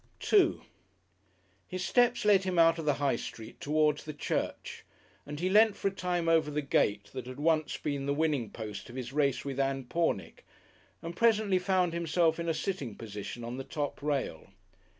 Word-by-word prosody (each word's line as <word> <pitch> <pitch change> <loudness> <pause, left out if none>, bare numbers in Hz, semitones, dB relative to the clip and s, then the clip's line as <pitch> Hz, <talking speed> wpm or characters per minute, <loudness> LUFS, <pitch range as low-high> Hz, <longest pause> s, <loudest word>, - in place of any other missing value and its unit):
§2 - - +3 1.0
His 185 0 -4
steps 245 -2 +3
led 200 -2 +5
him 185 -2 -2
out 165 0 +5
of 160 - -4
the 145 -2 +2
High 140 -4 +1
Street 110 -1 -9
towards 150 0 +1
the 155 -1 -7
church, - - -3 0.4
and 145 0 -6
he 180 - 0
leant 210 +2 +5
for 195 - 0
a - - -12
time 180 -3 -1
over 165 -2 +3
the 150 0 -2
gate 100 -7 +1
that 125 -2 -6
had 130 +2 -8
once 155 0 +1
been 140 -2 -3
the 140 - +2
winning 145 -7 0
post 105 -1 -7
of 120 - -10
his 130 0 -5
race 140 -3 +1
with 140 -1 -4
Ann 135 -1 0
Pornick, 120 - -2 0.6
and 170 +1 -6
presently 215 -4 +3
found 180 -2 +1
himself 170 0 +1
in 170 0 -2
a - - +2
sitting 165 - -3
position 110 +1 -7
on 120 +2 -5
the 135 - -4
top 145 0 -4
rail. 140 - -2
150 Hz, 190 wpm, -30 LUFS, 135-175 Hz, 1.0 s, led